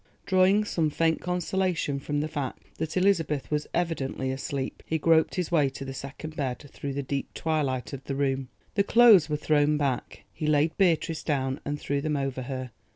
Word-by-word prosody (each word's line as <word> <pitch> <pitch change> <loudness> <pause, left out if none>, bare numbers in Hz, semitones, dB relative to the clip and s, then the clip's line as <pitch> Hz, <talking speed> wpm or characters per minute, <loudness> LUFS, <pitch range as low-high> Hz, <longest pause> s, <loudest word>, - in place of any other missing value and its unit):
Drawing 190 +2 +4
some 165 -6 0
faint 160 +2 +1
consolation 180 -4 -1
from 145 +1 -2
the 155 - -1
fact 145 -4 -4 0.2
that 160 +2 -2
Elizabeth 165 -8 +1
was 150 0 0
evidently 135 -6 -1
asleep, 135 0 -4
he 160 - -1
groped 160 +1 +3
his 180 -2 -2
way 150 -5 +3
to 135 +1 -8
the 135 - -5
second 140 +4 -7
bed 130 -4 -2 0.2
through 140 -1 -4
the 140 +1 -2
deep 135 +1 -3
twilight 145 -5 -1
of 135 -1 -7
the 135 - -3
room. 135 -2 -1 0.2
The 200 - +3
clothes 215 -7 +7
were 150 - 0
thrown 150 0 +2
back. 135 -4 -2
He 155 - -3
laid 150 +1 +2
Beatrice 165 -4 +2
down 135 -3 -1
and 145 +1 -2
threw 140 0 -1
them 150 0 -1
over 135 -2 -2
her. 130 -1 -5
150 Hz, 190 wpm, -27 LUFS, 135-165 Hz, 0.2 s, clothes